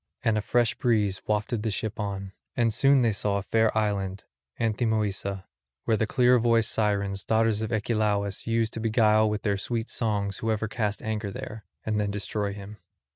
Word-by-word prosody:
And 115 - +2
a 105 - +1
fresh 120 +1 +2
breeze 105 -5 +1
wafted 105 +1 0
the 110 - -1
ship 110 +1 -3
on. 100 -2 -4 0.3
And 115 -2 +2
soon 135 +2 +4
they 115 - +3
saw 100 0 0
a 100 - -3
fair 110 +1 +2
island, 100 -2 -1 0.4
Anthemoessa, 105 -4 0 0.4
where 115 - +2
the 110 0 0
clear 125 0 +4
voiced 115 -1 +3
Sirens, 100 -2 0
daughters 110 -1 +2
of 110 - -3
Achelous, 105 -3 0
used 115 -1 +1
to - - -4
beguile 110 -1 +3
with 105 0 -3
their 100 -2 0
sweet 115 +2 -3
songs 100 -4 -1
whoever 110 0 -1
cast 105 -1 -2
anchor 110 -2 -2
there, 110 -2 -7 0.2
and 110 -1 0
then 105 -1 0
destroy 100 0 -2
him. 100 +1 -9
110 Hz, 180 wpm, -27 LUFS, 100-115 Hz, 0.4 s, soon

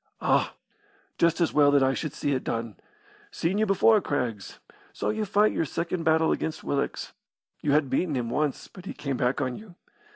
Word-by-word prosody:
"Ah! - - +1 0.6
Just 170 0 +3
as 170 - +1
well 145 -1 +5
that 140 -1 +4
I 135 0 +3
should 150 +1 -4
see 145 - -2
it 130 - -1
done. 115 -2 -3 0.5
Seen 190 - -1
you 220 - +2
before, 205 +2 +4
Craggs. 120 - -3 0.4
Saw - - -2
you 215 0 -1
fight 210 +2 +3
your - - 0
second 170 +2 -3
battle 160 0 +3
against 160 - -2
Willox. 140 - -2 0.5
You 145 - +1
had 150 -1 +3
beaten 150 +4 0
him 120 -2 -2
once, 150 0 -1
but 185 -1 -13
he - - -6
came 140 -3 -3
back 125 +2 0
on 130 -2 -1
you. 210 -5 -13
150 Hz, 195 wpm, -27 LUFS, 135-180 Hz, 0.6 s, well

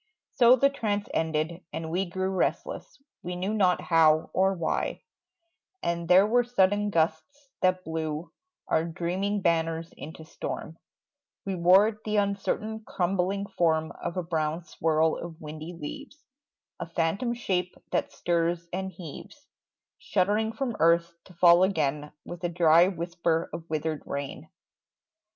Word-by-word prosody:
So 245 -1 +6
the 275 +2 +3
trance 210 -6 -2
ended, 160 +2 -1
and 160 0 -5
we 185 +3 0
grew 185 +2 -2
Restless, 195 - -2 0.2
we 180 +1 -5
knew 190 +4 -2
not 185 -4 +3
how 160 -2 +3
or 190 +1 +2
why; 170 -3 -2 0.8
And 170 0 -1
there 185 +3 +7
were 245 +3 +3
sudden 205 -3 +2
gusts 175 - -1
that 185 0 +2
blew 160 0 -4 0.4
Our 160 - +2
dreaming 185 +4 -2
banners 165 0 0
into 160 +1 -9
storm; 160 0 -6 0.7
We 195 - -2
wore 195 +5 +4
the 215 0 -1
uncertain 205 +2 -1
crumbling 195 +1 -1
form 165 -4 +1
Of 175 - -6
a 180 - -1
brown 160 0 -2
swirl 160 0 +1
of 170 -2 -8
windy 155 +3 -8
leaves, 285 - -8 0.6
A 170 - -4
phantom 175 +9 0
shape 185 -6 -2 0.2
that - - 0
stirs 170 0 -1
and 190 +1 -3
heaves 165 -6 -11 0.5
Shuddering 210 +4 +1
from 255 -3 -3
earth, 170 +1 +3
to 185 - -16
fall 175 +1 +6
again 150 -6 0
With 175 0 -8
a 175 - 0
dry 170 0 +5
whisper 170 -2 -1
of 165 0 -7
withered 155 -1 -2
rain. 140 +2 -5
175 Hz, 140 wpm, -27 LUFS, 160-195 Hz, 0.8 s, there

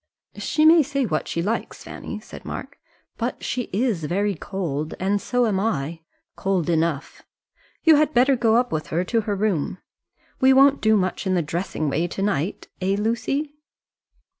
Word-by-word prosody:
"She 310 - +1
may 325 +1 +8
say 275 -2 -1
what 155 -8 -2
she 170 - -2
likes, 220 +5 -3
Fanny," - - -7
said - - -12
Mark, - - -7 0.4
"but - - -3
she 250 -2 -3
is 205 -6 0
very 200 +5 0
cold. 160 -4 -4
And 195 +2 0
so 245 -1 +1
am 205 -4 +1
I, 165 -7 -2 0.4
cold 185 -4 0
enough. 160 -2 -1 0.6
You 320 -2 +7
had 305 0 +3
better 265 +1 +4
go 230 -2 +2
up 245 +1 +2
with 155 -1 -2
her 170 +3 0
to 225 +4 0
her 210 -1 -2
room. 190 -5 -1 0.6
We 265 0 +6
won't 275 +1 +5
do 220 0 +4
much 185 +1 -1
in 185 - +2
the 175 - +1
dressing 155 0 -3
way 155 +5 0
to 185 - -5
night; 195 -3 -1
eh, 190 +2 +1
Lucy?" 255 +7 -1
200 Hz, 175 wpm, -23 LUFS, 170-245 Hz, 0.6 s, may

